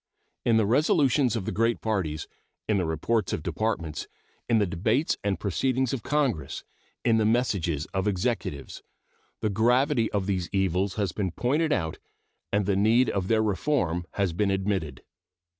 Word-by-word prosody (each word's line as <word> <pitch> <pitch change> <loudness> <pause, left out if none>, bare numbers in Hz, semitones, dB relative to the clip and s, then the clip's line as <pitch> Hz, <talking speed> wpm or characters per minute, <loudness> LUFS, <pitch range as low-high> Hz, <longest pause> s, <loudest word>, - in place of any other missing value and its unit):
In 115 -2 +3
the 110 - +3
resolutions 135 +1 +3
of 105 -5 -3
the 110 - -2
great 115 +2 +1
parties, 90 -9 -2 0.4
in 105 -2 +2
the 90 - -1
reports 95 +7 0
of 80 - -3
Departments, 85 -3 -2 0.4
in 115 - +4
the 105 - +3
debates 110 - 0
and 100 -3 0
proceedings 130 +7 0
of 130 - -2
Congress, 135 - -1 0.4
in 115 -2 +4
the 110 - +2
messages 100 - +1
of 95 +1 0
Executives, 95 - -2 0.6
the 110 - +1
gravity 120 +3 +2
of 100 -2 -1
these 95 -3 -1
evils 95 0 0
has 100 -4 -1
been 95 -1 -2
pointed 145 - 0
out 80 - -1 0.5
and 100 -1 +1
the 100 0 +1
need 110 +6 +3
of 95 -2 -2
their 110 0 +3
reform 95 - 0
has 100 -4 0
been 100 +4 +1
admitted. 95 -5 -2
105 Hz, 160 wpm, -27 LUFS, 95-115 Hz, 0.6 s, in